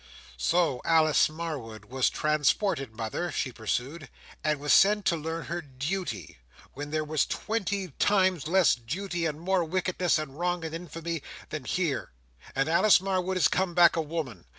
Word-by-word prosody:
"So 160 - +1
Alice 155 -2 +4
Marwood 145 -10 -6
was 130 +3 +1
transported, 150 - 0
mother," 115 +10 -3
she 130 - -2
pursued, 125 +6 -3 0.3
"and 150 -2 +1
was 145 +1 +2
sent 205 +1 +5
to 170 - +3
learn 160 +1 -4
her 175 +1 -3
duty, 135 - -5 0.3
where 145 +2 -6
there 155 +1 -1
was 155 -1 +1
twenty 200 -4 -2
times 185 -6 +2
less 185 +1 +4
duty, 170 +8 -3
and 150 -1 -4
more 185 +1 +1
wickedness, 180 +1 0
and 150 -1 -6
wrong, 175 -1 -1
and 160 - -5
infamy, 165 -1 -5 0.3
than 155 -4 -5
here. 170 - -2 0.4
And 135 +2 +1
Alice 175 +6 +5
Marwood 190 -1 -1
is 185 - +5
come 185 -2 -1
back 175 -1 +6
a 165 - +1
woman. 150 - -5
160 Hz, 160 wpm, -28 LUFS, 140-180 Hz, 0.4 s, back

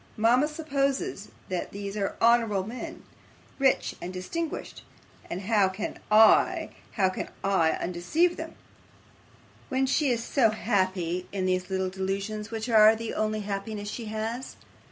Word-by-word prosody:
Mama 240 +6 +4
supposes 300 +2 -2 0.2
that 185 -2 -3
these 200 0 -5
are 200 -2 -2
honourable 230 -5 +3
men, 235 +4 -7 0.6
rich 270 -1 +2
and 180 - -5
distinguished, 300 - -5 0.5
and 180 - -4
how 200 -1 +3
CAN 190 +3 -5
I 215 +1 +5 0.2
how 195 -4 +3
can 185 - -5
I 190 -5 +3
undeceive 310 - 0
her - - -5 1.2
when 265 -1 +1
she 275 +2 +2
is 235 -2 0
so 240 -2 +3
happy 185 -5 -1
in 190 -2 -2
these 185 0 0
little 190 -1 -1
delusions, 195 +3 -3
which 225 0 -4
are 220 -1 +7
the 225 0 -5
only 215 0 -1
happiness 205 +1 -4
she 235 - -6
has? 220 +4 -4
215 Hz, 140 wpm, -27 LUFS, 190-240 Hz, 1.2 s, are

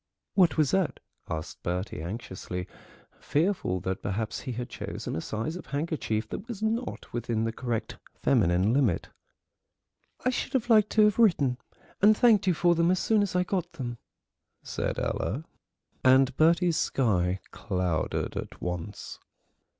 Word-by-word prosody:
"What 180 -6 +4
was 150 -3 +3
that?" 190 -4 +1 0.3
asked 80 +1 -5
Bertie 90 -1 -3
anxiously, 90 -1 -5 0.5
fearful 155 - 0
that 95 +1 -3
perhaps 105 +2 -2
he 130 - -5
had 120 +1 -4
chosen - - -5
a 80 - -2
size 115 - -3
of 180 - -8
handkerchief 140 -8 -2
that 210 - -6
was 220 -4 -6
not 230 +3 -2
within 115 -2 -1
the 115 - 0
correct 115 -1 -3 0.2
feminine 90 +6 +3
limit. 125 -11 +1 1.2
"I 255 - +4
should 250 - -3
have 245 -2 +1
liked 215 -2 +6
to 215 - +6
have 210 +1 +3
written 145 - +3 0.4
and 210 +2 +6
thanked 215 -5 +5
you 180 - +4
for 175 +2 +4
them 170 0 +2
as 185 - +3
soon 215 +3 +2
as 200 -3 -1
I 180 - +3
got 180 -2 -2
them," 120 -6 -5 0.6
said - - -3
Ella, 130 +10 -2 0.6
and 130 0 +5
Bertie's 170 +2 +4
sky 95 -7 +1
clouded 90 -6 -2
at - - -6
once. 90 +3 -5
135 Hz, 150 wpm, -28 LUFS, -, 1.2 s, liked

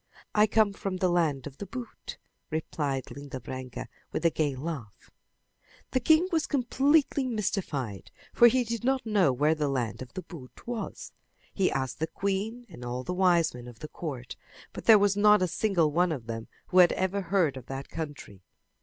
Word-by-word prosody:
"I 210 0 +5
come 215 -2 +3
from 195 -1 -4
the 185 0 +2
land 160 -7 +1
of 140 -1 -9
the 200 - -6
boot," 245 +4 -8 0.3
replied 145 -4 -2
Linda 140 -2 -7
Branca 130 +1 -7 0.2
with - - -3
a 165 - +5
gay 145 -4 0
laugh. 135 -7 -7 0.8
The 255 - +2
king 315 +7 +4
was 320 -3 +1
completely 275 +1 +2
mystified, 165 - -2 0.2
for 240 - +8
he 250 +2 +3
did 230 0 -4
not 265 0 +1
know 205 -9 +3
where 145 +5 +2
the 155 -2 -1
land 130 -5 -2
of 130 - -9
the 185 - -5
boot 135 -7 -12
was. 240 -2 -5 0.4
He 190 -2 +2
asked 130 -1 -2
the 160 - 0
queen 205 +7 -2
and 160 - -11
all 125 +1 -4
the 180 - -3
wisemen 170 -9 +2
of 120 -2 -11
the 155 - -7
court, 135 -8 -6 0.4
but - - -8
there 220 -2 +9
was 200 -1 +3
not 210 -1 +5
a - - +2
single 175 -4 +1
one 175 +3 +2
of 130 -7 -4
them 115 0 -5 0.2
who 185 - +4
had 175 -1 +7
ever 190 +2 0
heard 175 -6 +1
of 130 -2 -9
that 135 0 -5
country. 145 - -7
170 Hz, 190 wpm, -28 LUFS, 135-210 Hz, 0.8 s, there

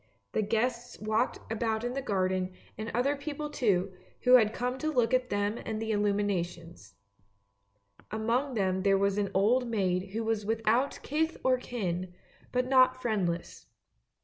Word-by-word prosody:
The - - +1
guests 235 +3 -1
walked 215 +4 0
about 225 0 -1
in 245 0 -2
the 275 - -2
garden, 185 -5 0 0.2
and 220 +2 -5
other 265 +5 +1
people 295 +1 -5
too, 195 -8 +1 0.3
who 250 - +4
had 220 -4 +7
come 250 +3 -2
to 310 - -1
look 245 -4 +2
at 255 -1 +2
them 205 +2 -1
and - - -10
at - - -3
the 225 0 -2
illuminations. 175 - -2 1.1
Among 235 +5 0
them 190 -3 +1
there 195 0 +4
was 200 +1 +1
an 200 -1 0
old 240 +6 +3
maid 190 -3 -1
who 225 +1 -1
was 220 -1 0
without 225 +5 +1
kith 320 +3 0
or 255 -1 +3
kin, 185 -7 -3 0.4
but 250 0 0
not 255 -1 +5
friendless. 190 -8 -2
220 Hz, 160 wpm, -30 LUFS, 195-250 Hz, 1.1 s, had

